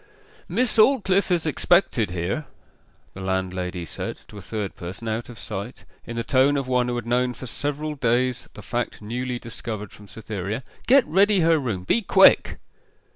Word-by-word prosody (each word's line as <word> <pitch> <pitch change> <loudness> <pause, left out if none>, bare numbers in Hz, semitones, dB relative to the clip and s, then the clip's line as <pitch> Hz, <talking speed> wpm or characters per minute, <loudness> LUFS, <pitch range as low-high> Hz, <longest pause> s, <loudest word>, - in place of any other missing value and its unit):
'Miss 245 -2 0
Aldclyffe 205 -6 +4
is 175 -3 +1
expected 155 - +2
here,' 90 - -3 0.7
the 95 - -9
landlady 95 -2 -2
said - - -5
to 105 - -11
a - - -10
third 105 0 -4
person, 95 +6 -7
out 110 +2 -3
of 120 - -10
sight, 105 +4 -6 0.2
in 120 - -5
the 115 - -2
tone 135 +3 +3
of 135 -2 -2
one 125 -1 +2
who 120 - -1
had 120 -2 -4
known 125 +1 +1
for 130 - -8
several 145 +4 -3
days 125 -1 0
the 105 - -10
fact 120 0 -3
newly 125 +3 -3
discovered 110 -3 -6
from 105 - -14
Cytherea. 110 +2 -5 0.2
'Get 265 0 +6
ready 195 +3 +3
her 165 -1 +4
room 110 -9 -3
be 230 - +2
quick. 195 -2 +5
120 Hz, 175 wpm, -24 LUFS, 105-150 Hz, 0.7 s, Get